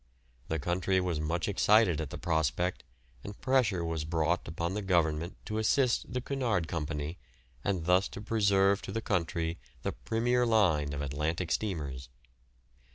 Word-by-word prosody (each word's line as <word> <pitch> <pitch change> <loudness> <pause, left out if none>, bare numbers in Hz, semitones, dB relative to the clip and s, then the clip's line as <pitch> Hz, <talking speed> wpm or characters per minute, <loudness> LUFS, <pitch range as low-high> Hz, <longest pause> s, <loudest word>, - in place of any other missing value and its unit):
The 80 - -1
country 90 +4 +1
was 90 -4 -1
much 80 +3 -1
excited 100 -4 +4
at 75 - -4
the - - -6
prospect, 85 +2 0 0.4
and 100 0 -8
pressure 115 -10 +2
was 80 -2 -2
brought 80 +2 0
upon 85 +2 -2
the 105 - -2
Government 85 -3 +1
to 110 0 -2
assist 125 +2 +2
the 125 - -2
Cunard 120 - -1
Company, 75 0 -3 0.4
and 95 -5 -1
thus 90 +2 +4
to - - -9
preserve 100 -2 +3
to - - -6
the 115 +2 -3
country 85 -3 -1 0.2
the - - 0
"premier" 115 - 0
line 90 -11 +3
of 70 0 -3
Atlantic 75 +5 -2
steamers. 70 -11 -2
90 Hz, 155 wpm, -30 LUFS, 80-105 Hz, 0.4 s, excited